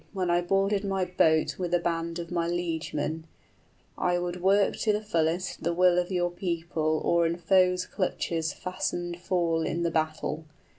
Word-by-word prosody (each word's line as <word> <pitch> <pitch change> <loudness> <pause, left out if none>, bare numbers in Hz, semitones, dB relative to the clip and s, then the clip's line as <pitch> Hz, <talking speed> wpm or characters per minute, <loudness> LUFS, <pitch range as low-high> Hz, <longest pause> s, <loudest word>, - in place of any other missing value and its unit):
} - - -33
When 185 -3 0
I 175 0 +3
boarded 195 +3 +1
my 195 -2 0
boat 160 -3 +2
with 175 -1 0
a - - +3
band 170 0 -2
of 170 0 -6
my 170 -1 0
liegemen, 160 -2 -2 0.7
I 180 0 +2
would 175 0 -3
work 195 +2 +3
to 215 - +2
the 210 - +1
fullest 170 -2 -1
the 170 - -1
will 180 0 +5
of 180 +1 -2
your 175 -1 0
people 165 -3 -1
Or 170 -1 +3
in 170 +1 -2
foe's 180 +1 +3
clutches 165 -3 -2
fastened 175 -1 -4
fall 170 -3 +1
in 170 +1 -1
the 170 - 0
battle. 155 -1 -2
175 Hz, 180 wpm, -28 LUFS, 165-180 Hz, 0.7 s, will